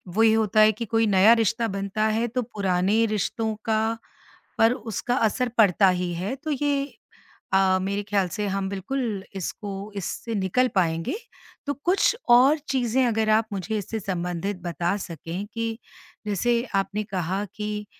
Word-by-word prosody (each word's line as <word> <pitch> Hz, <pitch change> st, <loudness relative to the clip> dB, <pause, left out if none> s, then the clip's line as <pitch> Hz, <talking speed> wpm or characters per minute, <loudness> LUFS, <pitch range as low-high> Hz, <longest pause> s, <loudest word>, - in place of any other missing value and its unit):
वही 225 Hz, 0 st, +5 dB
होता 220 Hz, -1 st, +2 dB
है 215 Hz, 0 st, +7 dB
कि 230 Hz, +2 st, -5 dB
कोई 225 Hz, +1 st, +2 dB
नया 200 Hz, +3 st, +6 dB
रिश्ता 225 Hz, +1 st, +1 dB
बनता 200 Hz, +1 st, -2 dB
है, 225 Hz, +2 st, 0 dB
तो 250 Hz, +2 st, -2 dB
पुराने 200 Hz, 0 st, +1 dB
रिश्तों 220 Hz, +1 st, -1 dB
का 220 Hz, -1 st, +2 dB, 0.8 s
पर 225 Hz, +2 st, +5 dB
उसका 245 Hz, 0 st, -3 dB
असर 245 Hz, +1 st, +1 dB
पड़ता 195 Hz, -2 st, +5 dB
ही 180 Hz, -1 st, -1 dB
है, 190 Hz, +9 st, -3 dB
तो 310 Hz, +2 st, -5 dB
ये 285 Hz, 0 st, 0 dB, 0.7 s
अ, 190 Hz, -1 st, +4 dB
मेरे 200 Hz, +1 st, -1 dB
ख़्याल 200 Hz, -2 st, 0 dB
से 210 Hz, +4 st, -3 dB
हम 195 Hz, 0 st, -2 dB
बिल्कुल 205 Hz, +1 st, -3 dB
इसको 200 Hz, +3 st, -5 dB, 0.3 s
इससे 225 Hz, +4 st, -4 dB
निकल 205 Hz, +6 st, +1 dB
पाएँगे। 165 Hz, -, 0 dB, 0.5 s
तो 285 Hz, -, -1 dB
कुछ 385 Hz, +5 st, +3 dB, 0.2 s
और 280 Hz, +5 st, +5 dB
चीज़ें 255 Hz, -1 st, +1 dB
अगर 220 Hz, -1 st, +1 dB
आप 220 Hz, +1 st, +3 dB
मुझे 200 Hz, +3 st, -3 dB
इससे 215 Hz, +2 st, -4 dB
संबंधित 180 Hz, 0 st, -3 dB
बता 175 Hz, +2 st, -1 dB
सकें 170 Hz, +4 st, -6 dB
कि 230 Hz, 0 st, -3 dB, 0.5 s
जैसे 235 Hz, +4 st, +1 dB
आपने 200 Hz, +2 st, 0 dB
कहा 190 Hz, +1 st, -2 dB
कि 210 Hz, 0 st, -4 dB
210 Hz, 155 wpm, -25 LUFS, 190-230 Hz, 0.8 s, है